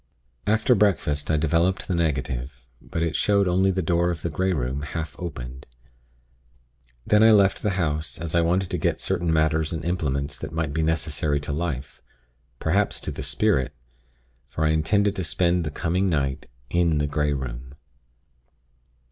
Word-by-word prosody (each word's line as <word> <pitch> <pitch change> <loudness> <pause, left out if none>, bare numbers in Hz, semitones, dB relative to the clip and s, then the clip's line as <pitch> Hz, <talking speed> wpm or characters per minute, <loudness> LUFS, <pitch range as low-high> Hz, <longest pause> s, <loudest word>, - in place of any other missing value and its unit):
"After 110 +4 +3
breakfast, 90 -9 +1
I 80 - +3
developed 85 +5 +1
the - - -1
negative; 65 -5 -2 0.2
but 85 - -3
it 80 -1 -1
showed 100 -2 +3
only 95 +2 +3
the 95 -1 0
door 85 +2 +2
of 85 -2 -4
the 85 - -2
Grey 95 +4 0
Room, 70 -4 -2
half 80 +1 -5
opened. 65 -7 -7 1.4
Then 105 0 +4
I 110 0 +7
left 100 -2 +4
the 105 - +1
house, 75 -5 -1
as 85 -1 -5
I 85 - +4
wanted 90 +2 +1
to - - -1
get - - 0
certain 85 -1 -1
matters 80 0 +2
and 80 -2 -4
implements 75 -5 -1
that 80 - -6
might 80 -3 -2
be 80 - 0
necessary 80 -2 0
to 75 - -4
life; 70 -4 -4 0.6
perhaps - - +1
to - - -3
the - - -6
spirit; 70 -1 +1 0.7
for 80 - -2
I - - +3
intended 100 +6 +2
to 95 - -1
spend 85 +3 +1
the - - -1
coming 90 +5 0
night 70 -5 -1 0.2
in 85 -3 +2
the 75 - +1
Grey 75 0 0
Room. 65 0 -6
80 Hz, 170 wpm, -24 LUFS, 75-90 Hz, 1.4 s, I